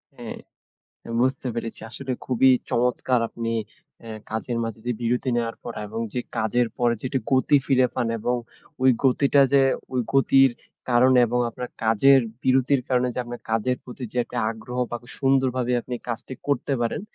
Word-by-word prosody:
হ্যাঁ, -, -, -7 dB, 0.8 s
বুঝতে 130 Hz, 0 st, 0 dB
পেরেছি। 115 Hz, -1 st, -5 dB
আসলে 130 Hz, +2 st, -5 dB
খুবই 130 Hz, +1 st, +4 dB, 0.2 s
চমৎকার! 125 Hz, 0 st, +1 dB
আপনি 115 Hz, 0 st, -4 dB, 0.5 s
আ -, -, -8 dB, 0.2 s
কাজের 115 Hz, +2 st, -2 dB
মাঝে 115 Hz, -1 st, -5 dB
যে 125 Hz, -, +1 dB
বিরতি 125 Hz, +3 st, 0 dB
নেওয়ার 115 Hz, -1 st, -2 dB
পর 120 Hz, -, -6 dB
এবং 110 Hz, +2 st, -5 dB
যে 125 Hz, -, -1 dB, 0.2 s
কাজের 120 Hz, +3 st, +1 dB
পরে 120 Hz, -1 st, +2 dB
যে -, -, -2 dB, 0.2 s
গতি 130 Hz, +2 st, +4 dB
ফিরে 130 Hz, -2 st, +4 dB
পান 120 Hz, -, 0 dB
এবং 125 Hz, +3 st, 0 dB, 0.5 s
ওই 130 Hz, -, +6 dB
গতিটা 140 Hz, +2 st, +4 dB
যে, 140 Hz, -1 st, +6 dB, 0.3 s
ওই 125 Hz, -, +2 dB
গতির 135 Hz, 0 st, +5 dB, 0.4 s
কারণে 125 Hz, +1 st, +5 dB
এবং 125 Hz, +2 st, -1 dB
আপনার 125 Hz, +2 st, -6 dB, 0.2 s
কাজের 135 Hz, +5 st, +5 dB, 0.2 s
বিরতির 130 Hz, +1 st, +3 dB
কারণে 125 Hz, -1 st, +2 dB
যে -, -, -4 dB
আপনার 120 Hz, 0 st, -7 dB
কাজের 115 Hz, +3 st, +1 dB
প্রতি 125 Hz, +1 st, -10 dB
যে -, -, -10 dB
একটা 125 Hz, -, -9 dB
আগ্রহ 115 Hz, +3 st, -7 dB
বা 120 Hz, -, -2 dB, 0.2 s
সুন্দরভাবে 130 Hz, -2 st, +1 dB
আপনি 125 Hz, -, -6 dB
কাজটি 120 Hz, +3 st, -5 dB
করতে 140 Hz, 0 st, 0 dB
পারেন। 115 Hz, -, -1 dB
125 Hz, 165 wpm, -24 LUFS, 120-130 Hz, 0.8 s, ওই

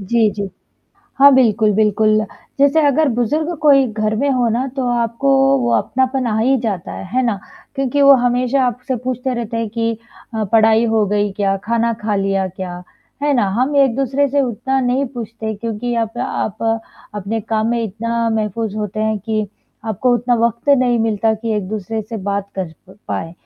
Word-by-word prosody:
जी, 220 Hz, +2 st, +2 dB
जी। 200 Hz, -1 st, -4 dB, 0.7 s
हाँ, 280 Hz, +1 st, +8 dB
बिल्कुल, 220 Hz, -4 st, +3 dB
बिल्कुल। 215 Hz, +1 st, +3 dB, 0.4 s
जैसे 285 Hz, +3 st, +4 dB
अगर 295 Hz, +2 st, +3 dB
बुज़ुर्ग 300 Hz, +8 st, -1 dB
कोई 275 Hz, -3 st, +5 dB
घर 215 Hz, 0 st, -1 dB
में 280 Hz, +5 st, 0 dB
हो 250 Hz, -3 st, +2 dB
ना 240 Hz, +4 st, 0 dB
तो 260 Hz, -2 st, -1 dB
आपको 235 Hz, +3 st, 0 dB, 0.3 s
वो 240 Hz, -2 st, 0 dB
अपनापन 260 Hz, 0 st, 0 dB
आ 220 Hz, -2 st, 0 dB
ही 260 Hz, +5 st, +3 dB
जाता 205 Hz, -7 st, -3 dB
है, -, -, -7 dB
है 255 Hz, -, +3 dB
ना? 230 Hz, -5 st, 0 dB, 0.4 s
क्योंकि 275 Hz, +1 st, 0 dB
वो 280 Hz, 0 st, +8 dB
हमेशा 250 Hz, +2 st, +1 dB
आपसे 250 Hz, +2 st, -3 dB
पूछते 255 Hz, 0 st, -2 dB
रहते 230 Hz, -1 st, -4 dB
हैं 230 Hz, -1 st, -2 dB
कि 230 Hz, +1 st, -1 dB, 0.4 s
अ, 220 Hz, -, -1 dB
पढ़ाई 225 Hz, 0 st, +5 dB
हो 220 Hz, -1 st, +2 dB
गई 205 Hz, 0 st, 0 dB
क्या? 195 Hz, 0 st, 0 dB
खाना 230 Hz, +1 st, +1 dB
खा 210 Hz, -1 st, 0 dB
लिया 195 Hz, -1 st, 0 dB
क्या? 180 Hz, -1 st, -7 dB, 0.4 s
है 290 Hz, 0 st, +2 dB
ना? 210 Hz, -6 st, +2 dB
हम 280 Hz, +3 st, +1 dB
एक-दूसरे 275 Hz, +1 st, +2 dB
से 285 Hz, +1 st, +1 dB
उतना 265 Hz, +1 st, -1 dB
नहीं 255 Hz, +2 st, +1 dB
पूछते 230 Hz, -3 st, -7 dB
हैं, 220 Hz, -1 st, -2 dB
क्योंकि 230 Hz, +2 st, -3 dB
आप 225 Hz, +2 st, -10 dB
आप 240 Hz, -4 st, -3 dB, 0.5 s
अपने 210 Hz, +2 st, -3 dB
काम 220 Hz, +1 st, -1 dB
में 235 Hz, -1 st, 0 dB
इतना 230 Hz, +2 st, -2 dB
महफ़ूज़ 220 Hz, -1 st, -2 dB
होते 210 Hz, 0 st, -3 dB
हैं 220 Hz, 0 st, 0 dB
कि 215 Hz, +1 st, -2 dB, 0.4 s
आपको 225 Hz, +3 st, 0 dB
उतना 240 Hz, +1 st, +1 dB
वक़्त 235 Hz, +4 st, -6 dB
नहीं 245 Hz, -2 st, +2 dB
मिलता 220 Hz, 0 st, +1 dB
कि 225 Hz, +1 st, -3 dB
एक-दूसरे 210 Hz, +2 st, -3 dB
से 220 Hz, +2 st, -7 dB
बात 200 Hz, 0 st, -2 dB
कर 185 Hz, -4 st, -4 dB, 0.2 s
प 190 Hz, -, -15 dB
पाएँ। 165 Hz, -, -3 dB
230 Hz, 185 wpm, -18 LUFS, 215-255 Hz, 0.7 s, हाँ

